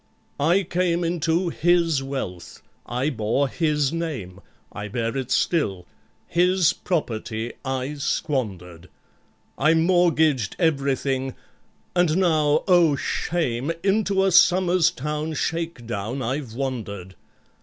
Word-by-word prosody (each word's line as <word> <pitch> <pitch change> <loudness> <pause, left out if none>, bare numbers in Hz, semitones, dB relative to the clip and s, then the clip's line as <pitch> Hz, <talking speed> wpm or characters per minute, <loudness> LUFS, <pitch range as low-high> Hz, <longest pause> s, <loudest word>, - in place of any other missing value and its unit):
"I 170 +7 +3
came 175 0 0
into 170 +1 0
his 170 -3 +2
wealth—I 130 - -5
bore 115 +3 0
his 150 -1 0
name, 135 - -4 0.3
I 105 +1 -6
bear 115 +2 -2
it 130 -2 -3
still—his 170 - 0
property 115 - -3
I 130 +1 -2
squandered— 95 - -3 0.7
I 155 +4 +4
mortgaged 160 - +2
everything—and 140 +3 -1
now 155 -5 +2
(oh, 175 -5 +5
shame!) 140 -2 -1
Into 195 -1 +2
a 195 - +2
Somers 180 -1 +5
Town 150 0 -4
shake 165 -5 -3
down 115 +4 -4
I've 130 -1 -3
wandered! 105 -8 -4
150 Hz, 100 wpm, -23 LUFS, 120-170 Hz, 0.7 s, oh